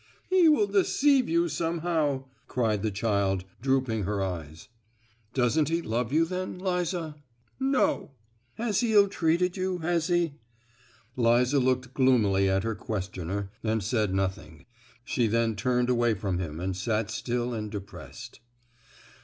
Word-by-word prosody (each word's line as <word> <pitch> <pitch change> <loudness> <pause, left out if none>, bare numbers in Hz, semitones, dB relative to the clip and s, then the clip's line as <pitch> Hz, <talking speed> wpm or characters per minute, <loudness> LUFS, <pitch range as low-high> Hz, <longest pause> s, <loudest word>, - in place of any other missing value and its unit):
"He 365 -3 +6
will 260 -9 +4
deceive 255 +7 +3
you 170 +1 +2
somehow!" 165 -4 -1 0.2
cried 110 -5 0
the 110 - 0
child, 100 -3 0 0.2
drooping 130 -4 +1
her 100 +1 -2
eyes. 80 -5 -5 0.7
"Doesn't 140 +4 +2
he 165 +1 +1
love 115 +2 -2
you, 160 +3 +3
then, 185 +2 -4
Liza?" 180 -4 -2 0.4
"No." 270 - +1 0.5
"Has 220 -3 0
he 235 -3 +1
ill 205 -1 +6
treated 175 -1 +1
you,—has 175 -3 -1
he?" 175 -4 +1 0.8
Liza 125 +3 +3
looked 130 0 0
gloomily 105 -8 +3
at 95 0 +1
her 115 - -1
questioner, 95 -2 -4
and 110 -1 0
said 110 -1 0
nothing. 95 -5 -3 0.4
She 120 -2 +1
then 115 0 +1
turned 125 +3 +1
away 120 -2 +2
from 95 -2 -2
him 80 -3 -5
and 95 +1 -2
sat 110 +2 -1
still 120 +1 -2
and 110 -2 -4
depressed. 100 -1 -9
125 Hz, 135 wpm, -27 LUFS, 105-170 Hz, 0.8 s, He